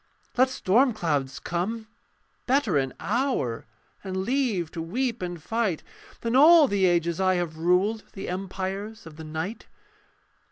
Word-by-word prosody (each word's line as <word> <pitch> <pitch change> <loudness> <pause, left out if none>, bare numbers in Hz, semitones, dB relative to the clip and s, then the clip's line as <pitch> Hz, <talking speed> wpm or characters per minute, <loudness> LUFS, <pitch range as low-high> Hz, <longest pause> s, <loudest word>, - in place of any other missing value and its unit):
Let 255 +1 +4
storm 250 +2 +3
clouds 145 -9 -1
come: 210 +6 -3 0.6
better 255 - +2
an 135 -2 +1
hour, 205 - -1 0.4
And 190 -1 -4
leave 210 - 0
to 165 - -5
weep 235 +7 -2
and 175 -1 -4
fight, 215 -1 -1 0.4
Than 230 +1 -1
all 310 +2 +8
the 200 -4 +2
ages 170 -1 +1
I 185 0 +3
have 170 -3 -2
ruled 185 +6 +2
The 195 - -6
empires 190 +3 -4
of 160 -2 -11
the 160 - -8
night. 160 +8 -5
190 Hz, 145 wpm, -26 LUFS, 170-230 Hz, 0.6 s, all